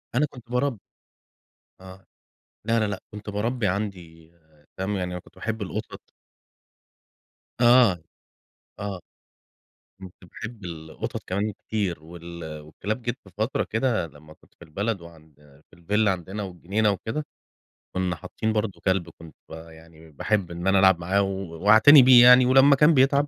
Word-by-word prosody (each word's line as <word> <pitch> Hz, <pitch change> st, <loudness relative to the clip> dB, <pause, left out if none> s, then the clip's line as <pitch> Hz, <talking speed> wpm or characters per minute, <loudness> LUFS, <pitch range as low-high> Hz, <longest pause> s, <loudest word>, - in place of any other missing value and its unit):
أنا 145 Hz, +5 st, +3 dB
كنت 120 Hz, -2 st, -15 dB
بارب 125 Hz, -1 st, 0 dB, 1.0 s
آه، 95 Hz, +1 st, -13 dB, 0.6 s
لا 115 Hz, 0 st, +2 dB
لا -, -, +1 dB
لأ، 100 Hz, -, -4 dB
كنت 105 Hz, 0 st, -8 dB
باربي 115 Hz, +3 st, -2 dB
عندي 90 Hz, -5 st, -5 dB, 0.5 s
فاهم، 100 Hz, +2 st, -2 dB
يعني 90 Hz, -1 st, -3 dB
أنا 90 Hz, -, -5 dB
كنت -, -, -22 dB
باحب 110 Hz, -1 st, -4 dB
القطط. 95 Hz, -, -7 dB, 1.5 s
آه، 120 Hz, -6 st, +6 dB, 0.8 s
آه، 100 Hz, -3 st, -5 dB, 1.0 s
كنت 95 Hz, -2 st, -10 dB
باحب 110 Hz, +3 st, -10 dB
القطط 80 Hz, -2 st, -7 dB
كمان 100 Hz, +3 st, -2 dB
كتير، 100 Hz, -6 st, -4 dB
وال 85 Hz, -2 st, -9 dB
والكلاب 100 Hz, +10 st, -5 dB
جيت 120 Hz, +2 st, -3 dB
في 95 Hz, -, -16 dB
فترة 110 Hz, +5 st, -1 dB
كده 110 Hz, -6 st, -1 dB
لمّا 75 Hz, 0 st, -16 dB
كنت -, -, -28 dB
في -, -, -15 dB
البلد، 100 Hz, +6 st, -3 dB
وعند 80 Hz, -2 st, -16 dB, 0.4 s
في -, -, -19 dB
الفيلّا 105 Hz, +5 st, +1 dB
عندنا 95 Hz, +3 st, -6 dB
والجنينة 100 Hz, +3 st, -1 dB
وكده، 110 Hz, +9 st, -4 dB, 0.7 s
كُنّا 90 Hz, -1 st, -1 dB
حاطّين 110 Hz, +5 st, -4 dB
برضه 105 Hz, -2 st, -3 dB
كلب 95 Hz, -2 st, 0 dB
كنت 80 Hz, -1 st, -15 dB
با 80 Hz, +1 st, -10 dB
يعني 80 Hz, 0 st, -17 dB
باحب 95 Hz, +4 st, -1 dB
إن 85 Hz, +2 st, -5 dB
أنا 95 Hz, 0 st, +4 dB
ألعب 95 Hz, -2 st, +5 dB
معاه 95 Hz, +4 st, +1 dB
و 95 Hz, -4 st, -5 dB
وأعتني 110 Hz, +8 st, +8 dB
بيه 125 Hz, -1 st, +8 dB
يعني، 125 Hz, +1 st, +8 dB
ولمّا 135 Hz, +2 st, +6 dB
كان 150 Hz, +4 st, +5 dB
بيتعب 140 Hz, +1 st, +3 dB
100 Hz, 150 wpm, -24 LUFS, 85-115 Hz, 1.5 s, وأعتني